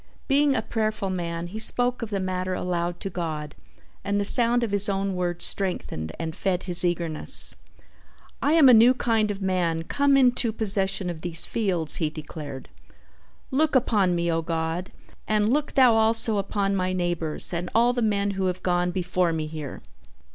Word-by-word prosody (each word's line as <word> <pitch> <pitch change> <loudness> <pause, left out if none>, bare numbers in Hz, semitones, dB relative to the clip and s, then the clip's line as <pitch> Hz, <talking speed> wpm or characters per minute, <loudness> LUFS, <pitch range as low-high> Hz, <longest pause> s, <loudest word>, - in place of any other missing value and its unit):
Being 280 0 +2
a 220 - -1
prayerful 215 -3 -3
man 170 -2 -4
he 195 +5 -7
spoke 245 +3 +1
of 230 - -5
the 200 -2 -3
matter 185 0 -3
aloud 175 -1 -3
to 195 - -4
God 155 -4 -5 0.5
and 200 0 -1
the 200 - -1
sound 240 +2 +7
of 225 - -3
his 205 0 +2
own 195 0 -2
words 175 -1 -2
strengthened 175 - -2
and 160 -1 -5
fed 185 -2 -2
his 180 -1 +5
eagerness. 170 -3 +2 0.9
"I 295 - +1
am 320 -4 +6
a 250 - +7
new 235 +3 +6
kind 225 -4 0
of 200 -1 -5
man 175 -3 -1
come 280 +8 +1
into 250 -3 +2
possession 195 -3 -1
of 160 -2 -10
these 170 -1 +1
fields," 185 -8 -1
he 160 -3 -1
declared. 150 -3 -9 0.8
"Look 295 +2 +1
upon 205 -8 +2
me, 170 0 -1
O 165 0 -1
God, 165 +2 -4 0.4
and 215 +2 +1
look 295 0 -2
Thou 255 -3 +5
also 225 -1 +2
upon 200 0 -2
my 185 -1 -1
neighbors 175 -3 -1
and 175 +1 -4
all 240 +2 +3
the 245 - -2
men 205 -2 0
who 190 -1 -2
have 180 0 -4
gone 180 -1 0
before 180 -1 -1
me 160 -1 -3
here! 155 -3 -8
190 Hz, 180 wpm, -24 LUFS, 170-220 Hz, 0.9 s, sound